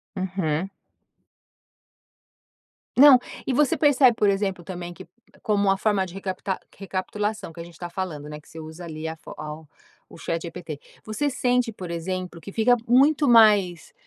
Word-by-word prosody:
Uhum. 185 -2 -2 2.3
Não, 270 -2 +9 0.3
e 260 - -1
você 290 +1 +2
percebe, 275 -5 +5
por 210 -2 +3
exemplo, 195 -3 -1
também 175 -1 -7
que, 165 - -12 0.3
como 205 -2 +1
uma 195 0 +3
forma 200 -2 +1
de 175 - -11
recapita 190 0 -4 0.2
recapitulação 200 0 -4
que - - -12
a - - -5
gente 170 0 -13
está 175 +1 -7
falando, 170 -5 -5
né, 150 0 -7
que 150 - -21
você 160 - -10
usa 160 +2 -9
ali, 160 -1 -6
a 160 - -4
fo - - -11
ao 155 0 -8 0.4
o - - -12
ChatGPT. 165 -2 -5 0.3
Você 255 +7 -1
sente, 250 -2 +1
por 185 -5 -8
exemplo, 180 0 -4
que 200 - -9
fica 235 +3 +3
muito 280 +4 +4
mais, 210 - +5
190 Hz, 160 wpm, -24 LUFS, 170-220 Hz, 2.3 s, Não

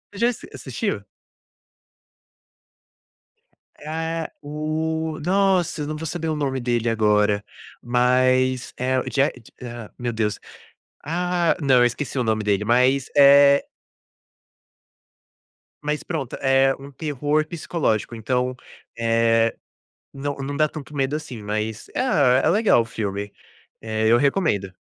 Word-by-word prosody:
Já 230 +4 +2
assis 240 - -7
assistiu? 125 -5 -3 2.8
É 150 - -11
a 160 +1 -3 0.2
é - - -9
o 155 +1 -3
nossa, 185 -3 +2
eu 145 - -3
não 155 - -3
vou 160 +1 -6
saber 165 +1 -3
o 155 - -1
nome 135 -3 -1
dele 120 -1 0
agora. 105 -2 +2 0.4
Mas 130 +1 +2
é 130 +1 +1
o - - -2
Je 135 - +1 0.4
ah, 120 -3 -8
meu 120 -1 -3
Deus. 110 -2 -1 0.7
Ah, 175 +2 0
não, 135 -4 +4
eu 120 - +6
esqueci 130 +3 -2
o 125 - +1
nome 110 -1 0
dele. 100 0 +1
Mas, 125 +4 +3
eh 140 0 +7 2.2
Mas 150 0 -2
pronto, 155 -8 -4
é 135 0 +3
um 140 +1 -12
terror 150 +1 -1
psicológico. 155 -10 -2
Então, 125 +3 -1 0.4
eh, 115 0 +2 0.6
não 140 +1 -4
não 140 +1 -4
dá 155 0 +3
tanto 150 0 -9
medo, 135 +1 0
assim, 150 -7 -6
mas, 110 +1 -3
ah, 140 - +3
é - - +3
legal 205 - +4
o - - -4
filme, 100 -3 -4 0.5
eh, 110 0 -1
eu 115 +2 +6
recomendo. 135 - +1
135 Hz, 135 wpm, -23 LUFS, 115-150 Hz, 2.8 s, eh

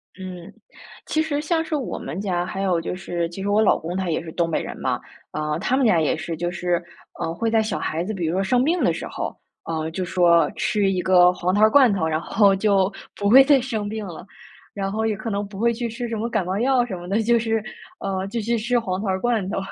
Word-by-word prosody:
嗯， 180 -2 -8 0.5
其 315 - 0
实 295 -2 -1
像 320 +1 0
是 315 - -3
我 275 -4 -3
们 170 - -5
家， 180 -3 -1
还 195 +1 -4
有 180 -4 +1
就 175 - -4
是 175 -2 -3
其 175 +3 -8
实 200 - -2
我 210 +2 +3
老 215 - +4
公 170 +3 -5
他 190 -2 -2
也 160 - -1
是 160 - -8
东 170 0 0
北 160 - 0
人 - - -6
嘛。 - - -1 0.3
啊， 150 +1 -2
他 250 +7 +1
们 270 - +2
家 180 -8 +4
也 155 - +1
是 165 +1 -4
就 175 +2 -2
是， 175 -1 -1 0.4
呃， 165 - -2
会 225 +5 -1
在 225 -1 +4
小 220 - -2
孩 165 +2 -2
子 215 - -4
比 180 -4 -3
如 160 - -1
说 190 +1 +1
生 245 +6 +2
病 335 +5 +1
的 - - +4
时 - - -5
候， - - -5 0.3
啊， 160 -1 -3
就 185 +3 -3
说 170 -2 +3
吃 205 -3 +1
一 185 -1 0
个 180 -1 +6
黄 180 +1 -1
桃 205 - +2
儿 215 - +7
罐 255 -3 +5
头， 160 -5 0
然 155 -1 0
后 195 +3 +3
就 195 -1 +2 0.2
不 200 0 0
会 265 +5 +9
再 275 -2 +4
生 220 -5 -3
病 220 0 -4
了。 170 -1 -9 0.5
然 195 -1 -3
后 220 +2 -1
也 215 - 0
可 230 - -5
能 200 0 -2
不 195 -1 -11
会 235 +1 +2
去 235 +1 -3
吃 240 +1 -5
什 230 - -3
么 230 +2 -2
感 215 -5 0
冒 185 +2 -2
药 255 0 +3
什 210 -6 -5
么 175 0 -9
的， 205 +4 +1
就 235 +1 +4
是， 225 -1 -1 0.4
呃， 190 -1 -2
就 230 +3 -3
去 235 +2 0
吃 240 +2 +1
黄 185 -5 -3
桃 215 - -3
罐 225 -4 0
头。 - - -3
195 Hz, 285 characters per minute, -23 LUFS, 175-230 Hz, 0.5 s, 会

